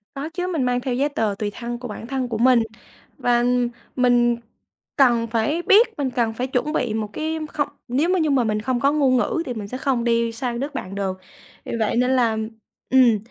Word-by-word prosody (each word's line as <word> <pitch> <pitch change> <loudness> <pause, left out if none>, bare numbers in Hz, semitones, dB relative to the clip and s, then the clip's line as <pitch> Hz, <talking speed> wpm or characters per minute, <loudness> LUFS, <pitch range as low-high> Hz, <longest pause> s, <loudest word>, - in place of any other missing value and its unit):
Có 280 +3 -4
chứ, 360 +2 -3
mình 330 -7 -1
mang 250 0 +1
theo 250 0 -2
giấy 275 +4 +1
tờ 220 -8 -1
tùy 210 -1 -2
thân 240 +2 -5
của 250 - -6
bản 225 +1 -7
thân 260 -1 -2
của 230 -2 -3
mình 240 0 +5 0.5
và, 240 -1 +2
ừm, 245 0 +2 0.3
mình 245 -2 +3 0.6
cần 240 -4 +4
phải 230 +9 0
biết 425 +7 +6
mình 275 -3 0
cần 235 -2 0
phải 250 +3 -3
chuẩn 265 +4 -1
bị 240 -7 0
một 215 -2 -2
cái 320 +4 -2
không, 290 -2 0 0.2
nếu 275 +8 +1
mà 370 0 +2
như 315 -2 +1
mà 270 -3 +3
mình 215 -1 -1
không 250 +2 -1
có 275 +3 +3
ngôn 275 -4 +3
ngữ 330 +6 0
thì 250 - -3
mình 215 -3 -6
sẽ 250 - -5
không 260 -3 0
đi 230 -1 +1
sang 235 +1 -3
đất 280 +3 -4
bạn 195 -6 -5
được. 190 -2 -2 0.5
Vì - - -6
vậy 220 0 +1
nên 250 +2 +2
là, 235 -4 +2 0.5
ừm, 255 -4 +5
245 Hz, 230 wpm, -22 LUFS, 230-275 Hz, 0.6 s, biết